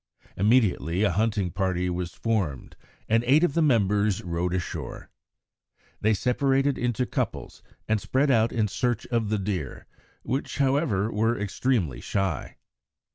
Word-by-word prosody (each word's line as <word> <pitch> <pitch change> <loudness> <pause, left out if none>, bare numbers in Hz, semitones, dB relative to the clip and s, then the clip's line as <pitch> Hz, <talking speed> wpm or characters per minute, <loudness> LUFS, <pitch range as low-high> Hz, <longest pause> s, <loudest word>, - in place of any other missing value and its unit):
Immediately 100 - +2
a 105 - +3
hunting 105 -1 0
party 90 -1 -1
was 90 -1 -3
formed, 100 - -2 0.3
and 115 +1 +2
eight 145 +6 +5
of 175 - +2
the 165 - +2
members 105 - +2
rowed 85 0 -2
ashore. 90 - -5 0.9
They 110 +1 +2
separated 135 +4 +1
into 125 +1 -1
couples - - -4 0.3
and 110 -1 +1
spread 135 +2 +1
out 115 -2 +3
in 110 -2 +1
search 120 +2 -1
of 115 -3 0
the 110 - +1
deer, 95 -8 -4 0.4
which, 135 +2 -3
however, 130 - +1
were 115 +3 +1
extremely 105 - -1
shy. 95 -7 -2
110 Hz, 135 wpm, -26 LUFS, 95-125 Hz, 0.9 s, eight